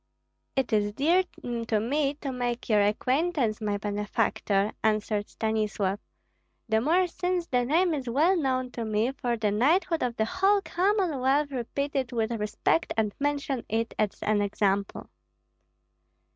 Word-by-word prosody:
"It 265 -4 0
is 205 -1 +2
dear 335 - +3 0.4
to 220 -2 +2
me 280 +5 0
to 280 -2 -5
make 245 -1 -3
your 210 -2 +4
acquaintance, 250 +2 +1
my 205 -1 -1
benefactor," 205 0 0
answered 215 -1 0
Stanislav, 215 -3 -1 0.7
"the 220 -1 +2
more 340 +8 +3
since 360 0 -2
the 250 -5 0
name 335 +6 +2
is 265 -5 -3
well 310 +10 +3
known 260 -5 0
to 235 - -4
me, 220 +3 0
for 245 -3 -2
the 215 -2 0
knighthood 325 - +2
of 245 -2 -1
the 220 - +1
whole 385 - +3
Commonwealth 305 -9 +1
repeat 280 +3 -3
it 260 -3 -1
with 225 -1 -1
respect 210 -8 0
and 215 -2 +1
mention 280 -3 -1
it 225 +1 -1
as 210 -2 0
an 210 -1 +2
example." 200 -1 -1
245 Hz, 145 wpm, -27 LUFS, 215-290 Hz, 0.7 s, your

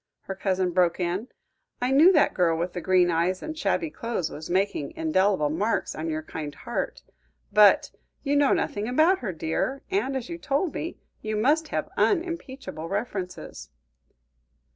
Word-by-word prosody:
her 195 - -5
cousin 185 -1 0
broke 175 0 +2
in. 180 +6 -1 0.5
"I 250 +1 0
knew 310 +7 +7
that 310 -6 +3
girl 170 -3 +2
with 175 +2 -2
the 175 - -4
green 180 0 +3
eyes 175 +3 0
and 315 0 -5
shabby 320 0 -1
clothes 230 - -3
was 155 +2 -8
making 200 - 0
indelible 200 - +2
marks 205 +8 -1
on 160 +1 -4
your 155 0 -3
kind 150 -2 -6
heart. 240 +7 -4 0.5
But 210 -1 +6 0.3
you 285 -1 +1
know 285 -1 +4
nothing 205 +1 0
about 315 +9 +3
her, 210 -6 -3
dear, 165 - -2
and, 275 -9 0
as 250 - -5
you 340 0 -6
told 300 +3 -1
me, 335 - -5 0.2
you 215 0 -3
must 295 +9 +2
have - - -2
unimpeachable 285 - -1
references." 190 - -5
210 Hz, 165 wpm, -26 LUFS, 175-285 Hz, 0.5 s, knew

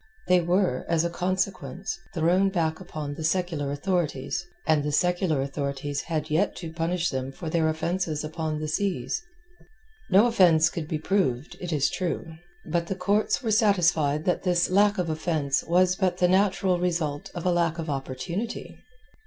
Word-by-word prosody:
They 180 0 +5
were, 175 -5 +1
as 165 0 +2
a 170 - -1
consequence, 185 +2 -2 0.2
thrown 180 +4 +3
back 160 -4 -1
upon 155 -5 -6
the 155 - -6
secular 160 -4 0
authorities, 175 +1 -2 0.2
and 155 -2 +3
the 150 - -1
secular 175 -2 +1
authorities 140 0 -3
had 155 -2 -3
yet 175 +7 +1
to 165 -3 -7
punish 170 +1 -1
them 130 0 -3
for 160 +3 -6
their 160 -1 +2
offence 170 +4 -1 0.2
upon 155 0 -3
the 155 - -3
seas. 155 - -1 0.9
No 200 +4 +6
offence 175 -8 +5
could 160 -3 -4
be 155 - -2
proved, 155 -6 0
it 175 -1 -4
is 145 -3 +2
true. 170 -2 -3 0.3
But 170 +1 -1
the 190 - -2
courts 205 +7 +1
were 225 - 0
satisfied 175 - +3
that 180 - +1
this 180 -1 +1
lack 205 +2 +4
of 180 -2 0
offence 155 -4 0
was 180 +2 +3
but 185 -2 0
the 180 - +3
natural 190 -1 +2
result 165 -5 -1
of 175 - -5
a 180 - +3
lack 170 -1 +1
of 165 -1 -4
opportunity. 150 - -4
170 Hz, 170 wpm, -26 LUFS, 155-185 Hz, 0.9 s, No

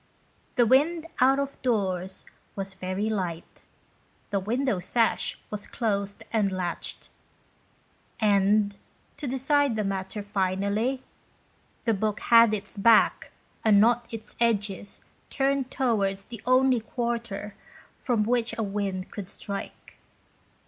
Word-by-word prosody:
The 245 -3 +5
wind 310 +7 +3
out 265 +2 +5
of 280 0 -3
doors 190 -6 -1 0.3
was 195 -1 -4
very 190 +2 -3
light. 180 -6 -4 0.7
The 200 - +1
window 230 +1 0
sash 230 +5 +1
was 210 -1 -5
closed 200 -3 -2
and 210 -3 +2
latched, 180 -2 -3 1.1
and, 205 -1 +3 0.4
to 290 - -5
decide 270 0 +2
the 215 - 0
matter 195 +1 -3
finally, 205 +6 -1 0.8
the 225 - +3
book 215 +1 -1
had 230 -1 +6
its 210 0 -4
back, 225 +2 +4 0.3
and 210 -2 +6
not 235 +2 +3
its 225 -1 -8
edges, 205 -4 0 0.3
turned 270 -1 0
towards 200 -8 0
the 235 -4 -9
only 255 -1 +4
quarter 230 -3 -3 0.4
from 235 -5 0
which 235 +1 0
a 225 - 0
wind 195 -2 -3
could 200 -3 -6
strike. 200 +1 -7
215 Hz, 120 wpm, -27 LUFS, 195-240 Hz, 1.1 s, had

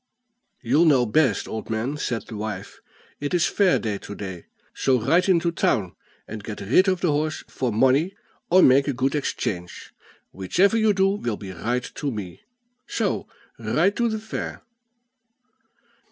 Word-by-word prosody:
"You'll 140 +8 +3
know 135 -6 +4
best, 125 -1 +2
old 110 - -6
man," 115 +6 -2
said 120 -7 -3
the 110 - -9
wife. 105 -2 -6 0.4
"It 145 +4 -2
is 170 - +3
fair 195 -3 +3
day 105 -3 -3
to 100 - -9
day; 95 -4 -7 0.3
so 130 -2 +2
ride 170 - +2
into 170 -2 +3
town, 105 - 0 0.3
and 105 -1 -7
get 105 0 -6
rid 125 - +3
of 185 -2 +1
the 175 - +2
horse 150 +1 -1
for 125 -2 -2
money, 135 - +2 0.3
or 185 +2 +6
make 135 +2 +5
a 140 - 0
good 130 +2 0
exchange; 95 - -4 0.4
whichever 185 - +2
you 220 -1 +4
do 195 0 +3
will 195 - -2
be 95 -2 -8
right 120 +8 -2
to 145 - -4
me, 105 -8 -6 0.5
so - - -1 0.3
ride 200 - +1
to 235 -1 +2
the 220 - -2
fair." 220 +1 -6
130 Hz, 165 wpm, -24 LUFS, 110-175 Hz, 0.5 s, or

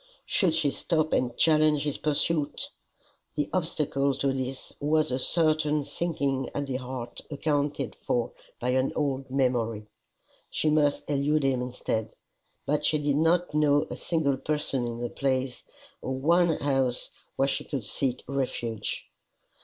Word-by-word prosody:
Should 175 -6 +2
she 155 -3 +2
stop 155 0 0
and 120 -1 +1
challenge 155 -2 +4
his 145 -2 -2
pursuit? 150 0 +1 0.6
The 150 -1 -1
obstacle 145 -5 +1
to 140 0 +1
this 130 0 -4
was 155 0 +2
a 130 - 0
certain 155 -1 +2
sinking 140 -3 -1
at 145 - -1
the 130 -2 -2
heart 125 -2 -6
accounted 145 -2 -1
for 120 -1 -1 0.3
by 125 - -1
an 130 +1 +2
old 135 -3 -1
memory. 120 -5 0 0.6
She 155 - +1
must 150 -2 +2
elude 145 +1 +1
him 130 -2 +2
instead. 125 -3 -3 0.5
But 150 +1 +1
she 155 - +4
did 145 -1 +1
not 165 +2 +2
know 150 -1 +4
a - - -3
single 155 -6 0
person 140 -4 -1
in 115 -1 -4
the 120 0 -3
place, 130 -2 -1 0.4
or 130 - -2
one 170 +4 +3
house 135 -3 0 0.2
where 135 - +2
she - - -1
could 135 -7 -4
seek 130 +2 -1
refuge. 120 -5 -2
140 Hz, 145 wpm, -28 LUFS, 130-150 Hz, 0.6 s, challenge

